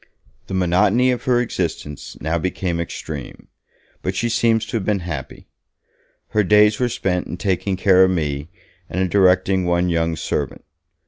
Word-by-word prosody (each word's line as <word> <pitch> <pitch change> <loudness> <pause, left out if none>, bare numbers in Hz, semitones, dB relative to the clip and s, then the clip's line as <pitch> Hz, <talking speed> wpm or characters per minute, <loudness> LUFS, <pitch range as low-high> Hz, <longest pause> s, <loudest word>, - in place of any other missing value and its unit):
The 95 - -4
monotony 100 +8 +3
of 125 +1 -3
her 125 -2 +3
existence 85 - -4
now 80 +3 -1
became 90 0 -2
extreme, 80 -3 -7 0.5
but 90 - -3
she 120 +4 0
seems 115 -1 +2
to 115 - -3
have 105 - -3
been 100 -1 0
happy. 80 -6 -6 0.8
Her 105 - +2
days 105 +2 +4
were 125 -1 +1
spent 90 -5 -1
in 90 - -6
taking 95 +1 -1
care 95 -1 +5
of 95 - +4
me, 75 -4 -2 0.4
and 90 - -3
in 95 -1 +1
directing 95 -1 +3
one 90 0 +1
young 85 -1 0
servant. - - -3
95 Hz, 165 wpm, -20 LUFS, 85-105 Hz, 0.8 s, care